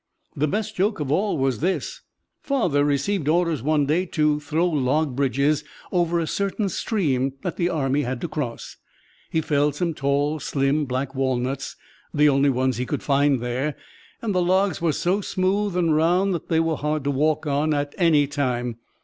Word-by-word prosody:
The 150 - +1
best 210 +7 -2
joke 200 +2 0
of 145 -2 -2
all 195 +4 +1
was 135 -4 0
this: 190 - -2 0.4
Father 175 - +1
received 145 +4 0
orders 170 -3 +1
one 150 +2 +2
day 170 +6 +1
to 150 -2 +1
throw 155 +3 0
log 145 -2 0
bridges 140 +2 +1 0.3
over 175 -2 +1
a 165 - 0
certain 200 +4 -1
stream 140 - 0 0.2
the 175 0 0
army 145 -4 0
had 130 -2 -3
to - - -2
cross. 145 -7 -5 0.5
He 160 - 0
felled 145 -1 +1
some 170 +1 -1
tall, 145 +2 0
slim 140 +2 0
black 130 +1 -3
walnuts 130 0 -2 0.4
the 150 0 +5
only 140 0 +3
ones 130 -2 0
he 125 - -2
could - - -3
find 140 -2 +2
there 130 +5 -2 0.5
and 215 -3 -1
the 180 - +2
logs 185 0 +1
were 170 -2 +2
so 180 +6 0
smooth 195 0 0
and 165 -3 +2
round 180 +5 +2
that 170 - -4
they 160 - +3
were 165 -2 0
hard 150 0 -1
to 140 - 0
walk 150 +3 +1
on 150 +2 +1 0.3
any 160 -5 +4
time. 125 -5 -2
150 Hz, 175 wpm, -23 LUFS, 140-175 Hz, 0.5 s, the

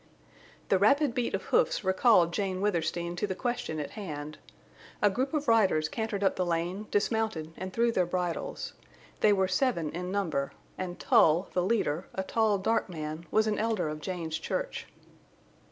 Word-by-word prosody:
The 190 - +4
rapid 275 +6 +4
beat 245 -1 -1
of - - -4
hoofs 475 - +2
recalled 190 -2 +4
Jane 190 -2 -1
Withersteen 170 -3 -1
to 210 - 0
the 190 - -3
question 240 -9 -2
at 145 - -4
hand. 155 -7 -6 0.6
A 205 - +4
group 260 +6 -1
of 300 -3 -2
riders 195 -9 +4
cantered 220 -1 -3
up 195 - +2
the 185 - +1
lane, 175 +4 -2
dismounted, 205 -7 0
and 185 +1 -6
threw 235 +3 +2
their 185 -6 +1
bridles. 180 - -3 0.5
They 215 - +5
were 190 -2 +3
seven 185 - 0
in 180 +2 -4
number, 165 -9 -1 0.2
and 180 -1 -5
Tull, 165 +4 +4
the 180 - +2
leader, 180 -5 0
a 190 - -1
tall, 215 +1 +2
dark 220 +3 0
man, 155 0 -6
was 215 0 +3
an 215 -1 0
elder 215 -7 0
of 155 0 -6
Jane's 165 -2 -3
church. - - -3
190 Hz, 170 wpm, -29 LUFS, 170-220 Hz, 0.6 s, They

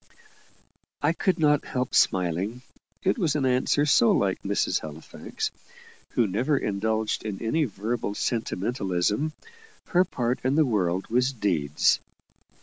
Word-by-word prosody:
I 155 +3 +3
could 180 +1 0
not 150 -3 +3
help 125 0 -3
smiling 95 +7 +1 0.4
it 195 +6 +1
was 160 -7 +1
an 140 -3 +1
answer 130 +3 +2
so 120 -5 +5
like 95 -2 +1
Mrs. 100 +1 0
Halifax, 80 0 -6 0.6
who 120 - +3
never 120 +9 +1
indulged 110 0 -1
in 105 -3 -4
any 150 +8 +1
verbal 110 -1 -3
sentimentalism. 105 - -1 0.6
Her 180 +1 +4
part 125 -9 -2
in 130 +2 +1
the 155 0 +4
world 95 -6 0
was 125 +2 +2
deeds. 80 - +1
115 Hz, 130 wpm, -26 LUFS, 100-140 Hz, 0.6 s, so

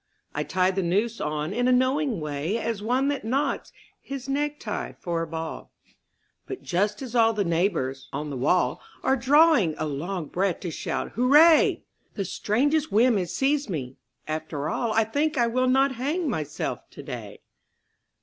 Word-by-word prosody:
I - - -2
tie 185 0 +1
the 190 0 -1
noose 205 +6 0
on 150 +3 -2
in 245 +3 +1
a - - +4
knowing 260 - +2
way 150 +6 -2
As 225 -2 -3
one 250 +5 +1
that 285 -5 -2
knots 275 +5 -1 0.3
his 275 -1 -7
necktie 295 +2 -2
for 170 -2 -3
a 165 - -3
ball; 160 0 -6 0.8
But 390 - -6
just 200 +8 0
as 245 -3 -7
all 225 -1 +5
the 210 -2 0
neighbours 165 -7 -1
on 150 0 -4
the - - -4
wall 150 +8 +1 0.2
Are 265 - +3
drawing 270 - +4
a 155 - -2
long 160 +4 -3
breath 185 +3 -1
to 175 - -4
shout - - -3
'Hurray!' 295 +7 +5 0.3
The 195 - -2
strangest 285 - 0
whim 235 +3 +4
has 180 -3 -2
seized 275 +3 +1
me... 135 -7 -4 0.3
After 155 -2 -3
all 235 -2 -1
I 225 +1 +3
think 290 +7 -1
I 240 - +4
will 255 +2 +1
not 270 +2 +4
hang 290 +8 -2
myself 155 - -3
today. - - -8
220 Hz, 170 wpm, -25 LUFS, 170-270 Hz, 0.8 s, all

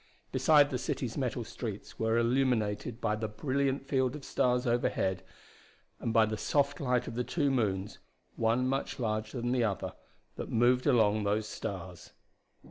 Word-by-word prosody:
Beside 145 +2 +5
the 125 - -1
city's 120 -2 -3
metal 125 -3 -2
streets 115 -2 -7
were 110 +1 +2
illuminated 120 -2 +1
by 105 -2 0
the 110 0 -3
brilliant 135 +5 -1
field 130 -2 +1
of 150 - -9
stars 125 0 +1
overhead 120 -6 0 0.8
and 115 - -2
by 110 -1 +5
the 110 0 -3
soft 145 -1 +1
light 125 -3 0
of - - -5
the 125 +2 -1
two 145 +1 0
moons, 105 -6 -1 0.4
one 115 +3 +1
much 135 +1 -2
larger 110 0 -2
than 120 +1 -1
the 125 -1 +2
other, 105 -4 -2 0.4
that - - -5
moved 125 +2 +3
among 110 -3 +4
those 105 +1 0
stars. 95 -4 -7
120 Hz, 160 wpm, -31 LUFS, 110-130 Hz, 0.8 s, Beside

